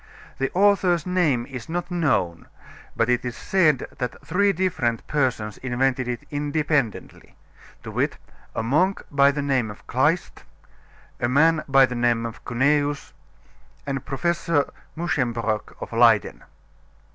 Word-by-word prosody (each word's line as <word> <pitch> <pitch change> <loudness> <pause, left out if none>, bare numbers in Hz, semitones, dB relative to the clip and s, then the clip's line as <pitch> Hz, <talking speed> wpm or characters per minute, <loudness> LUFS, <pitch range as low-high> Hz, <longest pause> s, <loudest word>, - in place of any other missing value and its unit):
The 135 - 0
author's 185 -4 +3
name 160 -10 +1
is 125 -2 -8
not 175 +2 -3
known, 130 - 0 0.5
but 115 - +1
it 125 0 +1
is 120 -1 -5
said 155 -9 +2
that 125 -1 -3
three 200 +7 +2
different 160 - -1
persons 125 -8 -1
invented 130 0 0
it 120 -1 -4
independently, 145 -4 -2 0.5
to - - -7
wit, - - -1 0.4
a - - -1
monk 175 +11 +1
by 140 -1 +5
the 140 0 -2
name 130 -5 0
of 105 - -11
Kleist, 150 +8 0 0.8
a 120 - 0
man 155 +4 +3
by 135 -1 +6
the 125 - -6
name 120 -1 +1
of 115 - -7
Cuneus, 145 +3 0 0.7
and 135 -2 -3
Professor 165 +1 0 0.2
Muschenbroeck 115 -10 -1
of - - -7
Leyden. - - +3
140 Hz, 135 wpm, -23 LUFS, 120-160 Hz, 0.8 s, by